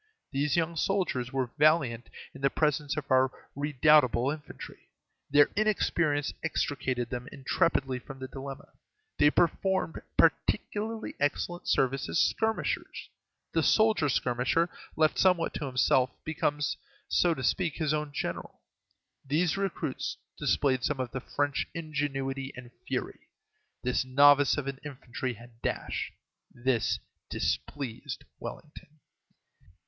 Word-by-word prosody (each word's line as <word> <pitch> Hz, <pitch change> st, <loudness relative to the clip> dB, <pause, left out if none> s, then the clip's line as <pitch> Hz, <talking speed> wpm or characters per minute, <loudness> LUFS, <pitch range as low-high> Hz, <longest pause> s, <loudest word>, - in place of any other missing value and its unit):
These 140 Hz, +1 st, +1 dB
young 170 Hz, 0 st, +1 dB
soldiers 155 Hz, -10 st, 0 dB
were 130 Hz, -3 st, -1 dB
valiant 140 Hz, -6 st, +3 dB, 0.2 s
in 135 Hz, -, -11 dB
the 140 Hz, -, +4 dB
presence 150 Hz, -1 st, 0 dB
of 145 Hz, -3 st, -5 dB
our 130 Hz, 0 st, +5 dB, 0.3 s
redoubtable 145 Hz, -2 st, +4 dB
infantry; 150 Hz, -1 st, -9 dB, 0.4 s
their 145 Hz, 0 st, +5 dB
inexperience 170 Hz, -8 st, +1 dB
extricated 130 Hz, -6 st, -1 dB
them 125 Hz, 0 st, -4 dB
intrepidly 135 Hz, -2 st, 0 dB
from 135 Hz, +2 st, -10 dB
the 130 Hz, 0 st, -6 dB
dilemma; 135 Hz, 0 st, -8 dB, 0.5 s
they 145 Hz, -, +7 dB
performed 175 Hz, +2 st, +1 dB, 0.2 s
particularly 220 Hz, +1 st, +1 dB
excellent 160 Hz, +4 st, -1 dB
service 135 Hz, +1 st, +1 dB
as -, -, 0 dB
skirmishers: 220 Hz, +5 st, 0 dB, 0.4 s
the -, -, +2 dB
soldier 220 Hz, -9 st, +4 dB
skirmisher, 125 Hz, +7 st, +1 dB, 0.3 s
left 155 Hz, -1 st, +2 dB
somewhat 180 Hz, -3 st, +3 dB
to 145 Hz, -, -3 dB
himself, 130 Hz, 0 st, +3 dB, 0.2 s
becomes, 150 Hz, -2 st, -1 dB, 0.3 s
so 175 Hz, -2 st, +3 dB
to 130 Hz, -, -5 dB
speak, 170 Hz, +4 st, +1 dB
his 155 Hz, -2 st, 0 dB
own 150 Hz, -1 st, -2 dB
general. 145 Hz, -, -5 dB, 0.6 s
These 155 Hz, +5 st, +1 dB
recruits 140 Hz, -8 st, -2 dB, 0.2 s
displayed 135 Hz, -3 st, +1 dB
some 145 Hz, -3 st, 0 dB
of 125 Hz, -2 st, -2 dB
the 130 Hz, -, -4 dB
French 145 Hz, +1 st, -1 dB
ingenuity 135 Hz, -4 st, -2 dB
and 125 Hz, -1 st, -10 dB, 0.2 s
fury. -, -, -3 dB, 0.6 s
This 125 Hz, +1 st, +1 dB
novice 140 Hz, +2 st, +5 dB
of 150 Hz, -, -2 dB
an 135 Hz, -1 st, -4 dB
infantry 130 Hz, -3 st, -5 dB
had 115 Hz, +1 st, -16 dB
dash. -, -, -2 dB, 0.4 s
This 120 Hz, -2 st, 0 dB, 0.3 s
displeased 130 Hz, -4 st, -3 dB, 0.2 s
Wellington. 150 Hz, 0 st, -10 dB
145 Hz, 125 wpm, -29 LUFS, 130-155 Hz, 0.6 s, they